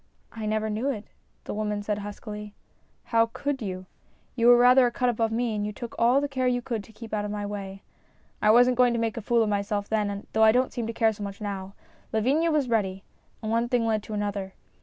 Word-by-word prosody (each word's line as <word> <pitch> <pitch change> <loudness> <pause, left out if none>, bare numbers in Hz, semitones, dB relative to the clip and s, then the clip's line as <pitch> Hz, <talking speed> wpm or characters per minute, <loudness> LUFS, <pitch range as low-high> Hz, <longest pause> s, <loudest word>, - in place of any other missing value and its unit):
" - - -39
I 220 -2 -5
never 215 0 0
knew 220 +6 -1
it," 220 -6 -4 0.4
the - - -5
woman 210 -1 -2
said 210 0 -2
huskily. 210 0 -7 0.2
" - - -40
How 230 -1 +4
should 285 -2 -2
you? 185 -3 -5 0.5
You 235 -1 +3
were 245 0 +9
rather 250 +1 +6
a - - -2
cut 250 +1 +1
above 225 -1 0
me, 230 0 0
and 205 - -1
you 210 - -2
took 235 +2 -8
all 240 +4 +5
the 285 - -1
care 260 -2 -1
you 245 0 +2
could 235 -3 -4
to - - -16
keep 225 0 -11
out 210 -1 0
of 205 - -3
my 205 0 -3
way. 195 -1 -6 0.6
I 210 - +4
wasn't 245 +2 +5
going 250 -1 +4
to 235 - 0
make 225 -1 -1
a 230 - -4
fool 230 +2 +2
of 215 - -1
myself 205 0 -1
then, 205 -2 -1
though 220 - +4
I 220 0 +7
don't 255 +1 +1
seem 235 -2 -3
to - - -2
care 225 -1 +2
so 210 - -12
much 200 -1 -6
now. 195 -2 -5 0.4
Lavinia 275 +10 +2
was 300 -4 +1
ready, 195 -5 0 0.4
and 215 - -2
one 230 +1 +1
thing 245 -2 +1
led 220 -1 +1
to 215 +1 -6
another. 200 -2 -3
220 Hz, 250 wpm, -26 LUFS, 205-240 Hz, 0.6 s, were